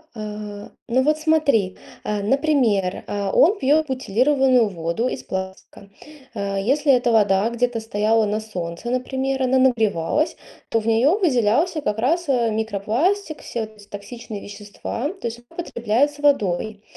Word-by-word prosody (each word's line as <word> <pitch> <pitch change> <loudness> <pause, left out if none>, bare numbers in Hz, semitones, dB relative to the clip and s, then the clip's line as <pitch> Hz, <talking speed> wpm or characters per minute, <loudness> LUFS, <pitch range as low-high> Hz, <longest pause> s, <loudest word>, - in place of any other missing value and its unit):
А, 210 -1 -7 0.2
ну 255 +2 +2
вот 305 +1 +2
смотри, 295 -12 +2 0.3
а, 210 -1 -2
например, 240 -7 +1
а, 200 -1 -2
он 395 +7 +4
пьет 300 +4 +3
бутилированную 255 0 +2
воду 170 +6 -2
из - - -4
пластика. 190 +1 -7 0.4
А, 200 -2 -3
если 275 +9 +2
эта 245 -2 +3
вода 205 -2 +3
где-то 240 0 0
стояла 220 0 +1
на 210 +1 -1
солнце, 185 -1 -6
например, 265 +1 -1
она 260 +1 +3
нагревалась, 235 - +1 0.3
то 225 - +2
в 220 - -6
нее 230 +6 +4
выделялся 300 - +2
как 210 -5 -2
раз, 320 +7 0
а, 240 -4 +2
микропластик, 225 - -1
все 235 - -4
вот 220 0 -7
эти 205 0 -16
токсичные 215 +1 -8
вещества, 205 +6 -5
то 380 -11 -5
есть 230 +1 -6
он - - -12
употребляет 235 -2 +1
с 290 - -15
водой. 215 -7 +1
230 Hz, 150 wpm, -22 LUFS, 205-270 Hz, 0.4 s, он